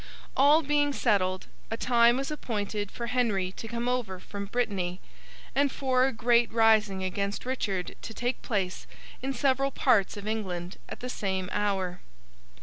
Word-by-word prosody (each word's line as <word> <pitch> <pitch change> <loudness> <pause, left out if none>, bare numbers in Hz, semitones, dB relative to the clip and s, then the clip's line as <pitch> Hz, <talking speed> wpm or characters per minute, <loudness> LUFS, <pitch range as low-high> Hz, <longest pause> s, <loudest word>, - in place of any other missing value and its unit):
All 290 +4 +6
being 290 0 +2
settled, 190 -7 +1 0.2
a 225 - -3
time 235 0 +4
was 270 +2 -2
appointed 210 -7 -3
for 235 - -5
Henry 220 -6 0
to 225 - -8
come 235 +1 -3
over 240 -7 -1
from 200 +2 -6
Brittany, 195 -5 -1 0.5
and 280 0 +2
for 260 -1 +2
a - - -1
great 235 0 +3
rising 220 -4 +4
against 200 +3 -2
Richard 200 -8 -2
to - - -7
take 245 +1 -2
place 195 -6 -2 0.3
in 270 +2 -2
several 270 +1 +2
parts 230 -7 +2
of 205 +1 -7
England 185 -5 -3
at - - -7
the 250 - -4
same 190 -6 -2
hour. 190 -4 -1
225 Hz, 155 wpm, -28 LUFS, 195-250 Hz, 0.5 s, All